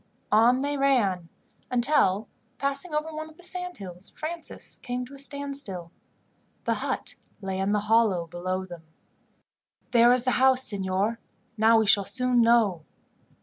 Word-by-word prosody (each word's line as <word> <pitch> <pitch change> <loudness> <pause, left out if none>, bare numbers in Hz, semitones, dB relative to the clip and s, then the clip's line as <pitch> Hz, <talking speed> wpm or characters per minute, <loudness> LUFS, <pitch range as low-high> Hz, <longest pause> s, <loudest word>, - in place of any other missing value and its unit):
On 235 +4 +4
they 285 0 -2
ran, 200 -11 +1 0.4
until, 240 -5 +2 0.3
passing 280 +5 -3
over 305 +1 -2
one 315 0 -6
of 315 - -19
the 360 - -12
sand 360 0 -1
hills, 180 -2 -9
Francis 330 +2 -6
came 250 0 -4
to 260 - -15
a 275 - -7
standstill. 275 - -2 0.7
The - - 0
hut - - -1 0.3
lay 190 -1 -4
in 195 +1 0
the 210 0 +1
hollow 210 -5 +2
below 185 +3 -4
them. 175 -3 -10 1.1
"There 240 0 +6
is 250 -1 +4
the 255 - +1
house, 260 -1 +5
signor. 200 +2 0 0.4
Now 225 +1 +4
we 220 - +2
shall 200 -1 +4
soon 250 +3 +2
know." 225 -8 +3
235 Hz, 150 wpm, -26 LUFS, 195-275 Hz, 1.1 s, There